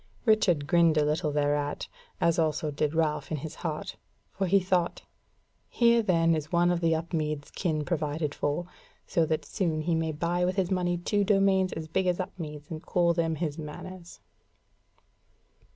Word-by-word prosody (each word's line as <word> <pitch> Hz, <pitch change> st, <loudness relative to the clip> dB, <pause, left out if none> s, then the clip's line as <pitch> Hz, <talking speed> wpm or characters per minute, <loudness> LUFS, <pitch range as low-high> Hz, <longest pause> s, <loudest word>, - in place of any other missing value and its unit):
Richard 185 Hz, -9 st, +3 dB
grinned 165 Hz, 0 st, +4 dB
a 150 Hz, -, +4 dB
little 150 Hz, +1 st, 0 dB
thereat, 145 Hz, 0 st, 0 dB, 0.3 s
as 170 Hz, 0 st, +2 dB
also 155 Hz, -1 st, 0 dB
did 150 Hz, +1 st, -1 dB
Ralph 150 Hz, -3 st, 0 dB
in 155 Hz, -, 0 dB
his 155 Hz, +3 st, -6 dB
heart; 160 Hz, -3 st, -4 dB, 0.3 s
for 190 Hz, 0 st, -2 dB
he 200 Hz, +3 st, +5 dB
thought: 180 Hz, -2 st, 0 dB, 0.7 s
"Here 235 Hz, -1 st, +4 dB
then 165 Hz, -5 st, +3 dB
is 155 Hz, -1 st, -3 dB
one 175 Hz, 0 st, +3 dB
of 175 Hz, -1 st, 0 dB
the 165 Hz, -1 st, +3 dB
Upmeads 155 Hz, -3 st, -3 dB
kin 155 Hz, -5 st, -1 dB
provided 150 Hz, -3 st, -1 dB
for, 145 Hz, +4 st, -1 dB, 0.4 s
so 165 Hz, -2 st, +1 dB
that 155 Hz, 0 st, -1 dB
soon 165 Hz, -6 st, -1 dB
he 165 Hz, +2 st, 0 dB
may 160 Hz, -1 st, 0 dB
buy 170 Hz, +3 st, -1 dB
with 180 Hz, +1 st, +1 dB
his 190 Hz, -2 st, 0 dB
money 175 Hz, -1 st, +1 dB
two 205 Hz, +4 st, 0 dB
domains 195 Hz, -2 st, +3 dB
as 160 Hz, 0 st, -5 dB
big 185 Hz, +4 st, 0 dB
as 180 Hz, 0 st, +1 dB
Upmeads 150 Hz, -5 st, -6 dB
and 155 Hz, -1 st, -5 dB
call 170 Hz, -1 st, +2 dB
them 165 Hz, -1 st, 0 dB
his 155 Hz, -1 st, -3 dB
manors." 170 Hz, +4 st, -9 dB
165 Hz, 170 wpm, -28 LUFS, 150-180 Hz, 0.7 s, he